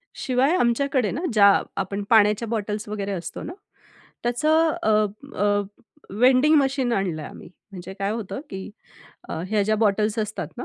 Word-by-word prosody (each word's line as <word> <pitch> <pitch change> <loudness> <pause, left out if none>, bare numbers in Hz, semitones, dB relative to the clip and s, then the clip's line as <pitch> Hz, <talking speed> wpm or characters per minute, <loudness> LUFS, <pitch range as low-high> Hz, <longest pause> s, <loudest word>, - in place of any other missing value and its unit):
शिवाय 265 +6 +1
आमच्याकडे 250 - +1
ना, 285 - -4
ज्या 200 -2 +6 0.2
आपण 200 +2 -4
पाण्याच्या 215 0 +4
बॉटल्स 215 -1 -3
वगैरे 200 -1 -4
असतो 175 -3 -6
ना. 345 - -6 0.7
त्याचं 310 +7 +2
अ, 220 - +2 0.5
अ, 205 0 +2 0.5
वेंडिंग 255 +7 +4
मशीन 270 -3 0
आणलंय 180 -7 -2
आम्ही. - - -12 0.2
म्हणजे 185 0 -8
काय 200 0 -1
होतं, 225 +3 -5
की 190 0 -7 0.6
अ, - - -4
ह्या 210 0 +1
ज्या 215 +2 +1
बॉटल्स 210 +1 +1
असतात 215 -1 -3
ना, 250 - -4
215 Hz, 150 wpm, -23 LUFS, 200-250 Hz, 0.7 s, ज्या